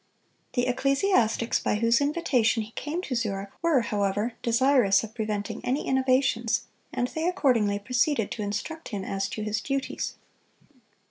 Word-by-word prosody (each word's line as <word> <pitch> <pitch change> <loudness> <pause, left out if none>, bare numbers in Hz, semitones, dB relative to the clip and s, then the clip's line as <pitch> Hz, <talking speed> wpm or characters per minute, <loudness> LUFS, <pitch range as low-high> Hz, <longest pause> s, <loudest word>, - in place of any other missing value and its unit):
The 245 -1 +1
ecclesiastics 255 - +2
by - - 0
whose 230 +4 +3
invitation 280 -7 +2
he 215 - -12
came 315 +9 -4
to 275 - -4
Zurich 200 -4 -2
were, 330 -6 +3
however, 205 +1 -1
desirous 235 -4 +4
of 220 -1 -8
preventing 215 -3 -3
any 265 +4 -1
innovations, 260 -3 +2 0.3
and 245 - -1
they 320 +2 -2
accordingly 245 - +2
proceeded 240 +2 0
to 220 - -4
instruct 225 - -4
him 205 -5 -4
as 195 0 -2
to 215 - -4
his 215 +1 -1
duties. 275 -1 -3
235 Hz, 145 wpm, -27 LUFS, 210-275 Hz, 0.3 s, desirous